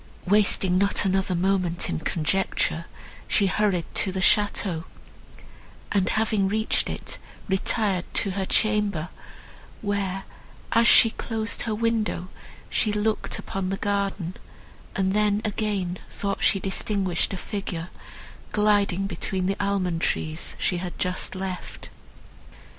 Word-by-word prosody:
Wasting 190 -2 +3
not 200 +1 +2
another 190 -1 +1
moment 180 -1 +1
in 80 - -2
conjecture, 165 - 0 0.4
she 205 - +4
hurried 195 -3 +1
to 190 - +1
the 190 - -3
château, 190 -4 +2 1.1
and, 195 -3 +2
having 215 -3 +2
reached 220 +2 0
it, - - -5 0.3
retired 190 -1 0
to 195 - +2
her 195 +1 -2
chamber, 210 -6 +1 0.7
where, 195 -2 -1 0.5
as 230 +1 +5
she 225 - +8
closed 225 -1 -2
her 225 -2 -1
window 220 -5 0 0.4
she 215 - +1
looked 210 +1 0
upon 190 -1 -3
the 195 - -1
garden, 200 -3 -1 0.6
and 190 -1 +1
then 210 0 +3
again 200 -4 -1
thought 200 -1 -3
she 195 - +4
distinguished 190 -1 0
a 195 - -3
figure, 180 -4 -4 0.6
gliding 205 -3 +3
between 190 -1 -2
the 195 +1 0
almond 185 -4 0
trees 155 0 -1
she 180 - 0
had 175 0 -5
just 180 +1 -2
left. 185 -1 -6
195 Hz, 125 wpm, -25 LUFS, 185-210 Hz, 1.1 s, she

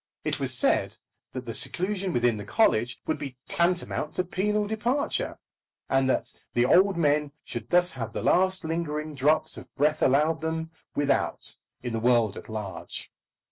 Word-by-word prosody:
It - - -1
was - - -1
said - - +2 0.4
that 130 -1 -5
the 115 - -4
seclusion 190 - -1
within 120 -5 +2
the 105 - -5
college 110 +3 +2
would 155 - -1
be 135 -3 -6
tantamount 170 -3 0
to 180 - +1
penal 210 +3 0
departure, 240 - -1 0.5
and 135 0 +3
that - - 0 0.2
the 120 0 +4
old 190 +7 +5
men 150 -2 +2
should 120 0 -6
thus 180 0 +4
have 115 -6 -5
the - - -4
last 185 -1 +3
lingering 155 -2 -2
drops 150 +3 +2
of - - -11
breath 150 +2 +2
allowed 155 +4 +3
them, 160 0 -2 0.2
without, 140 -2 0 0.3
in 120 -2 -3
the 115 - 0
world 115 -3 +3
at - - -10
large. 105 -3 -6
150 Hz, 165 wpm, -27 LUFS, 125-180 Hz, 0.5 s, old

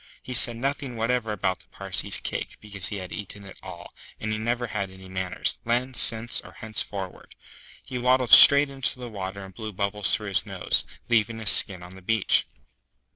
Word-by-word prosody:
He 130 - -7
said 120 -1 +5
nothing 135 0 -4
whatever 115 0 -1
about 95 -2 -2
the - - -21
Parsee's - - -1
cake, - - -6
because 100 -3 -4
he 105 - -5
had 95 -2 -8
eaten 100 0 -9
it 95 - -13
all; 90 -2 -11 0.3
and 110 - -4
he 110 - -3
never 120 +2 -2
had 105 -4 -4
any 95 0 -14
manners, 95 -1 -3
then, 125 +3 -1
since, 115 -1 +1
or - - -15
henceforward. 100 -4 -6 0.5
He 130 -2 -6
waddled 125 0 +1
straight 140 0 +9
into 135 -1 -2
the 125 -1 -8
water 95 -1 -7
and 95 - -14
blew 110 +1 -7
bubbles 100 +1 -1
through 105 -2 -6
his 95 - +2
nose, - - -1 0.2
leaving 115 -1 0
his 110 -3 +4
skin 90 -3 +4
on 90 +1 -12
the 95 - -14
beach. 110 +2 +1
110 Hz, 190 wpm, -24 LUFS, 95-120 Hz, 0.5 s, straight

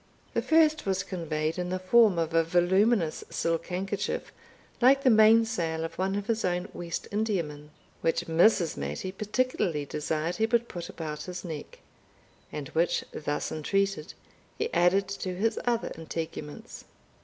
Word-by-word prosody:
The - - +1
first 310 -5 +3
was 190 -1 +1
conveyed 160 -2 -2
in 180 0 -2
the 185 - -1
form 200 +1 +4
of 165 -1 -1
a 165 0 +4
voluminous 180 +2 +2
silk 165 -1 -1
handkerchief, 195 +3 -3 0.5
like 270 +3 +5
the 260 - +6
mainsail 220 -7 +4
of 165 - -5
one 190 +1 0
of 205 0 -2
his 225 0 -1
own 180 +1 0
West 170 -1 -5
Indiamen, 170 -9 -2 0.3
which 165 - 0
Mrs. 170 +1 +3
Mattie 70 - -4
particularly 205 - -1
desired 155 +3 -2
he 220 - +2
would 235 0 +1
put 175 -6 -7
about 155 -2 -6
his 180 0 -6
neck, 155 -4 -7 0.7
and 145 -3 -5
which, 170 +2 +1
thus 145 -1 -3
entreated, 195 +2 -1 0.4
he - - -2
added 180 +3 +3
to 190 -2 -4
his 220 +5 0
other 235 -1 0
integuments. 160 -2 -6
180 Hz, 150 wpm, -28 LUFS, 160-210 Hz, 0.7 s, the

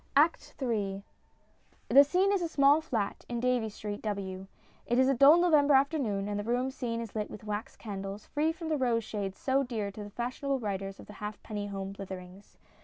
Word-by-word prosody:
] - - -33
ACT 330 - -11
III 205 -6 -1 0.9
The 280 - +9
scene 365 +7 +2
is 395 - +1
a 340 - 0
small 290 0 +4
flat 225 -10 -2
in 240 -1 -2
Davies 245 -3 0
Street, 205 -1 -5
W. 195 -3 -4 0.4
It 240 - +1
is 260 0 +5
a 275 - +4
dull 275 +5 +7
November 300 -5 +5
afternoon, 265 -8 +1
and 205 0 -2
the - - -2
room 245 +4 0
seen 240 -4 -3
is 230 -3 -6
lit 210 -1 -2
with 210 - -10
wax 210 +1 -4
candles, 195 -1 -6
free 305 +2 0
from 325 0 -6
the 310 - +1
"rose 240 -4 +1
shades" 200 -3 -4
so 270 +1 +1
dear 225 -6 -3
to 210 +1 -8
the 205 - -8
fashionable 255 +5 -2
writers 195 -4 -4
of - - -12
Halfpenny 210 0 -6
Home 195 -1 -5
Slitherings. 190 0 -9
230 Hz, 200 wpm, -30 LUFS, 205-275 Hz, 0.9 s, The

